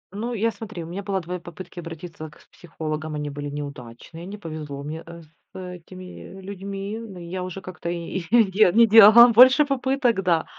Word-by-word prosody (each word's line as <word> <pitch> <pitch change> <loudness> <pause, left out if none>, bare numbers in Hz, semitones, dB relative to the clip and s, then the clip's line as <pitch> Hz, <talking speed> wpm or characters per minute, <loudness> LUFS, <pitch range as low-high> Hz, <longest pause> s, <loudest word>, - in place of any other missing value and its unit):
Ну, 230 +4 -4
я, 230 +1 0
смотри, 210 -4 -8
у - - -9
меня 185 +4 -6
было 195 -1 -2
2 180 +2 -6
попытки 175 +1 -11
обратиться 165 -1 -9
к 150 - -21
психологам, 155 -2 -6
они 150 0 -4
были 145 0 -6
неудачные, 145 +2 -9
не 200 +3 -8
повезло 155 -6 -7
мне, 155 +3 -7
э, 170 0 -11 0.3
с - - -10
этими 185 +1 -11
людьми. 195 +2 -6
Ну 220 -5 -10
я 180 +2 -6
уже 185 +1 -7
как-то 185 -2 -7
и 170 +1 -4
де 215 -4 +4
не 230 +1 +6
делала 225 +2 +9
больше 255 +5 +7
попыток, 265 -5 0
да. 170 -3 +1
185 Hz, 180 wpm, -23 LUFS, 165-210 Hz, 0.3 s, делала